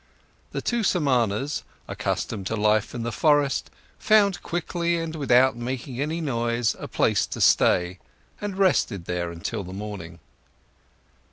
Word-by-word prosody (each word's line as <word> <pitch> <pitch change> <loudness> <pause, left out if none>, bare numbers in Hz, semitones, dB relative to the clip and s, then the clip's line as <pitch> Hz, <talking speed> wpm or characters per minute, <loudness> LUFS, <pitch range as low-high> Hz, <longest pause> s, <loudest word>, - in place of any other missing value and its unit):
The - - -4
two 240 -1 0
Samanas, 135 - +1 0.3
accustomed 95 -1 -3
to 110 - -2
life 105 +1 +1
in 120 - -3
the 120 - -2
forest, 145 0 +2 0.3
found 205 -3 +3
quickly 170 0 -1
and 165 -1 -4
without 130 -3 +4
making 125 +2 -4
any 155 +3 -1
noise 120 -4 0
a - - -6
place - - +1
to - - -6
stay 90 +1 +3 0.4
and 205 -2 -4
rested 175 - +2
there 90 -1 -2
until 95 +5 -4
the 90 0 -9
morning. 95 -5 -7
125 Hz, 140 wpm, -25 LUFS, 105-165 Hz, 0.4 s, without